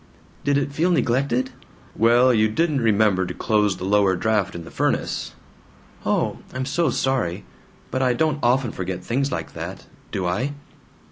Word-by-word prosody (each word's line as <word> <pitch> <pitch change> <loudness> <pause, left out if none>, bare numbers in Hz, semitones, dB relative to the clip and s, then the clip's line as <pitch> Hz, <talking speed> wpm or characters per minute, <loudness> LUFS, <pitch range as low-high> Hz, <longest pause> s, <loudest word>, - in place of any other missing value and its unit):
"Did 145 0 +2
it 140 0 -1
feel 160 +5 +1
neglected?" 130 -5 +1 0.4
"Well, 120 +3 +5
you 110 -1 +4
didn't 145 +5 0
remember 105 -4 +3
to 90 - -5
close 105 -3 +1
the 90 - -5
lower 100 -1 +3
draft 100 0 0
in 85 - -6
the - - -11
furnace." - - -1 0.7
"Oh, - - 0 0.2
I'm 130 0 -2
so 170 +4 +1
sorry. 105 -8 -1 0.5
But 130 - -1
I 125 -1 +3
don't 155 +3 +1
often 125 0 +2
forget 90 -1 -4
things 135 +4 -1
like - - -4
that, - - -7 0.3
do 95 - -2
I?" 120 +11 -1
120 Hz, 160 wpm, -23 LUFS, 100-135 Hz, 0.7 s, Well